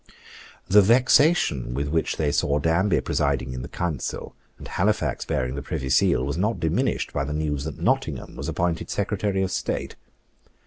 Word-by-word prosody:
The 105 +2 +7
vexation 115 - +3
with 70 +2 -1
which 80 +2 -1
they 75 -2 +1
saw 70 0 +1
Danby 85 +6 +2
presiding 65 0 -1
in 65 - -5
the - - -6
Council, 85 -5 -4 0.2
and - - -10
Halifax - - 0
bearing 65 0 -1
the 70 - -4
Privy 65 -1 -4
Seal, 65 -1 +3
was 70 +3 -3
not 105 +4 0
diminished 80 -1 0
by 70 - 0
the 70 +2 -4
news 75 -2 -2
that 80 -3 -5
Nottingham - - -1
was - - -5
appointed 85 -1 -1
Secretary 95 -2 -1
of 95 - -2
State. - - -3
80 Hz, 170 wpm, -24 LUFS, 70-95 Hz, 0.2 s, The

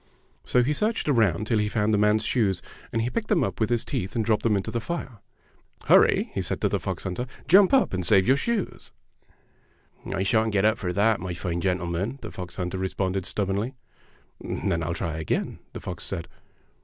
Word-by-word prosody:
So 125 - +3
he 145 +5 +1
searched 215 +6 0
around 110 - +2
tilbhe 105 -2 +1
found 110 0 +1
the - - +4
man's 105 +1 +3
shoes, 105 -7 +1 0.3
and 115 0 0
he 120 - -2
picked 230 -2 -2
them 200 -6 +2
up - - -3
with 110 - +1
his 120 -2 0
teeth 120 -9 -3
and 115 -2 0
dropped 110 -2 +2
them 110 -3 +2
into 95 - -3
the 115 - -2
Are. 135 -10 -4 0.3
" - - -27
Hur - - +8
ry!" - - 0
he - - -1
said - - -2
to - - +2
the - - 0
fox - - -4
hunter; 95 +8 -3 0.2
"jump 190 +2 +7
up 270 - +3
and 90 -1 -1
save 95 +2 +4
your 130 - +6
shoes!" 225 +5 -3 1.2
"I 95 - -1
shan't 110 +2 +2
get 100 0 +3
up 110 +1 +3
for 90 -3 -2
that, 105 +3 +2
my 90 -1 -4
fine 85 -1 -3
gentle 90 -1 0
man," 95 +10 -2
the - - -6
fox 90 -1 -7
hunter 90 0 -3
responded 95 0 -2
stubbornly. 100 +6 -2 0.6
"Then 85 - -2
I'll 85 +1 -2
try 80 -5 -3
again," 80 -2 -2
the - - -6
fox - - -6
said. 85 - -4
105 Hz, 215 wpm, -26 LUFS, 95-120 Hz, 1.2 s, Hur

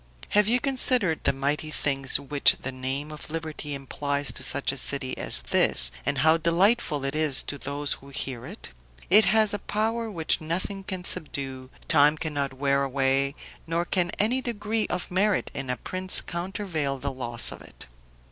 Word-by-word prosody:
Have 210 0 +2
you 245 +3 +2
considered 250 - +2
the - - +4
mighty 140 +3 -2
things 135 -3 +3
which 140 0 +2
the 135 - -4
name 135 +3 -5
of 150 0 -9
liberty 155 -2 -6
implies 140 +1 -2
to - - -3
such 135 +1 +2
a 135 - -6
city 135 -1 +1
as - - +4
this, - - +6 0.2
and 140 0 0
how 160 +1 +5
delightful 170 - +1
it 135 - -3
is 155 -4 +4
to 145 - -6
those 145 +1 -3
who 140 - -13
hear 130 -3 -5
it? - - -11 0.4
It 210 +2 +7
has 215 0 +3
a 205 - -3
power 225 +2 -2
which 165 -6 0
nothing 185 +5 -3
can 185 -2 -4
subdue, 135 -6 -5 0.2
time 150 0 +4
cannot 145 -4 -4
wear 140 +1 0
away, 135 +1 0 0.3
nor 165 +1 -1
can 175 -1 -1
any 240 +5 +1
degree 220 -2 -3
of 180 0 -5
merit 200 +2 0
in 135 -2 -6
a 125 - -2
prince 185 0 0
countervail 170 -5 -4
the 140 - -5
loss 120 -3 0
of - - -10
it. - - -9
150 Hz, 175 wpm, -25 LUFS, 135-185 Hz, 0.4 s, It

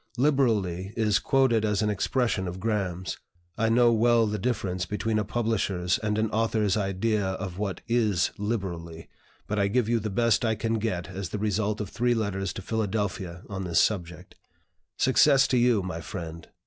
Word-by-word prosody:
'Liberally' 110 - +1
is 105 -3 +2
quoted 130 -5 +2
as 105 -1 +1
an 105 - +1
expression 105 -1 0
of 90 +1 -5
Graham's. 95 -4 -2 0.4
I 115 0 +1
know 120 +1 +5
well 115 0 +4
the 105 0 -2
difference 95 -5 -1
between 110 +1 -1
a - - 0
publisher's 100 -5 0
and 105 -1 -1
an 110 0 0
author's 110 -2 +1
idea 105 +1 0
of 95 -1 -4
what 100 -3 -3
is 110 -7 +2
'liberally'; 85 -7 -4 0.4
but 105 0 -2
I 100 - +3
give 110 +2 +1
you 115 0 +2
the 110 0 -3
best 115 +3 +2
I 110 -1 +1
can 115 +1 -1
get 90 -6 -2
as 95 -1 -5
the - - -4
result 105 0 -1
of 105 -3 -4
three 120 0 +1
letters 100 -3 -2
to 95 - -7
Philadelphia 100 -5 -2
on 95 -2 -5
this 85 -2 +1
subject. 85 -6 -1 0.6
"Success 135 +1 +5
to 130 - +2
you, 120 -5 +3
my 85 -3 -5
friend! 85 -2 -7
105 Hz, 175 wpm, -27 LUFS, 95-115 Hz, 0.6 s, know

